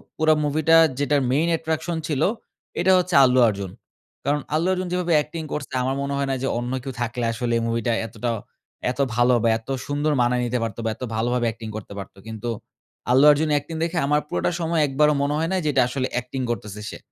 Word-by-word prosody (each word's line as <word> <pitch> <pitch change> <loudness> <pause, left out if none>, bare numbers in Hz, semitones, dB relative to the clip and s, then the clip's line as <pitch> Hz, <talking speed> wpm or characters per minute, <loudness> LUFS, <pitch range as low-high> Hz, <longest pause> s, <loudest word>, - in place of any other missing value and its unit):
পুরা 155 0 +4
মুভিটা 155 +2 +3 0.2
যেটার 145 0 +2
main 155 +5 +2
attraction 160 +1 -2
ছিল, 150 -4 -1 0.6
এটা 185 +2 +4
হচ্ছে 180 -1 0
আল্লু 130 0 +4
অর্জুন। 100 -3 -3 0.5
কারণ 145 +1 +1
আল্লু 165 +4 +1
অর্জুন 185 -1 -1
যেভাবে 180 -1 0
অ্যাক্টিং 160 +2 -2
করছে 145 -3 -5
আমার 130 +1 0
মনে 140 0 -2
হয় 140 - -1
না - - +1
যে - - +1
অন্য 120 +1 -4
কেউ 135 - -4
থাকলে 120 0 -2
আসলে 120 +1 -2
এই 115 - -1
মুভিটা 115 0 0 0.2
এতটা 115 +1 -3 0.6
এত 130 - -10 0.2
ভালো 120 +1 +4
বা, 115 - +4
এত 115 +3 -16 0.2
সুন্দর 145 +2 0
মানায় 125 +1 +2
নিতে 125 +1 -1
পারতো 115 +1 -4
বা, - - +1
এত - - -9
ভালোভাবে 120 +2 0
অ্যাক্টিং 115 0 -5
করতে 100 -1 -9
পারত। 95 - -8
কিন্তু 110 +1 -5 0.6
আল্লু 130 +3 +6
অর্জুন 155 +2 +1
অ্যাক্টিং 145 +3 -1
দেখে 170 +1 -2
আমার 150 +1 +2
পুরাটা - - -1
সময় 165 -1 +1
একবারও 150 +2 +3
মনে 140 +1 0
হয় 165 +1 0
নাই 190 - +1
যে 150 - +2
এটা 130 - +4
আসলে 130 0 -2
অ্যাক্টিং 125 +2 -3
করতেছে 105 -2 -5
সে। - - -8
140 Hz, 210 wpm, -23 LUFS, 120-155 Hz, 0.6 s, আল্লু